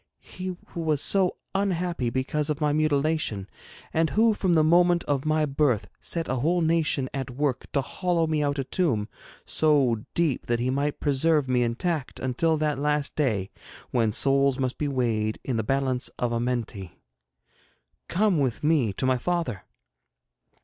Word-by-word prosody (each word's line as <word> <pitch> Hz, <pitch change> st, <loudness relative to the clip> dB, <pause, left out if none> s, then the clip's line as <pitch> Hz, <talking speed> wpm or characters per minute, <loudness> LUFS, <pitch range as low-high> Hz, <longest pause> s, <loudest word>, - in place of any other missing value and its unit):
He 185 Hz, 0 st, -7 dB
who 170 Hz, -, -5 dB
was 155 Hz, -3 st, +1 dB
so 190 Hz, +3 st, +1 dB, 0.2 s
unhappy 180 Hz, -9 st, 0 dB
because 140 Hz, +5 st, -1 dB
of 150 Hz, -1 st, -1 dB
my 150 Hz, -2 st, +1 dB
mutilation, 150 Hz, -8 st, 0 dB, 0.5 s
and 160 Hz, 0 st, +2 dB
who 225 Hz, +1 st, +3 dB
from 185 Hz, -4 st, +1 dB
the 155 Hz, -, +5 dB
moment 175 Hz, +2 st, +4 dB
of 140 Hz, -1 st, -1 dB
my 155 Hz, 0 st, +2 dB
birth 135 Hz, -6 st, +1 dB
set 165 Hz, -1 st, -3 dB
a 130 Hz, -, -1 dB
whole 170 Hz, +7 st, +1 dB
nation 160 Hz, -4 st, +1 dB
at 135 Hz, -1 st, -3 dB
work 130 Hz, +1 st, -2 dB
to 140 Hz, -, +2 dB
hollow 170 Hz, +4 st, 0 dB
me 155 Hz, -1 st, 0 dB
out 145 Hz, 0 st, 0 dB
a 135 Hz, -, 0 dB
tomb 130 Hz, -, 0 dB, 0.4 s
so 140 Hz, -8 st, +2 dB
deep 165 Hz, -6 st, 0 dB
that 120 Hz, -1 st, +1 dB
he 125 Hz, +2 st, 0 dB
might 140 Hz, +2 st, -1 dB
preserve 145 Hz, 0 st, +2 dB
me 125 Hz, -1 st, +2 dB
intact 135 Hz, +5 st, -2 dB
until 155 Hz, +6 st, +1 dB
that 150 Hz, -2 st, 0 dB
last 150 Hz, 0 st, 0 dB
day 110 Hz, -10 st, 0 dB, 0.4 s
when 115 Hz, -3 st, +2 dB
souls 135 Hz, +3 st, +3 dB
must 130 Hz, -2 st, -2 dB
be 150 Hz, -, 0 dB
weighed 115 Hz, -5 st, 0 dB
in 125 Hz, -4 st, -2 dB
the 110 Hz, -, 0 dB
balance 130 Hz, +1 st, 0 dB
of 120 Hz, -1 st, -1 dB
Amenthi! 115 Hz, -6 st, -3 dB, 1.2 s
Come 195 Hz, -2 st, +2 dB
with 130 Hz, -3 st, -1 dB
me 150 Hz, -9 st, +2 dB
to 130 Hz, -, -2 dB
my 130 Hz, -1 st, +2 dB
father. 165 Hz, -, -2 dB
145 Hz, 165 wpm, -26 LUFS, 125-160 Hz, 1.2 s, the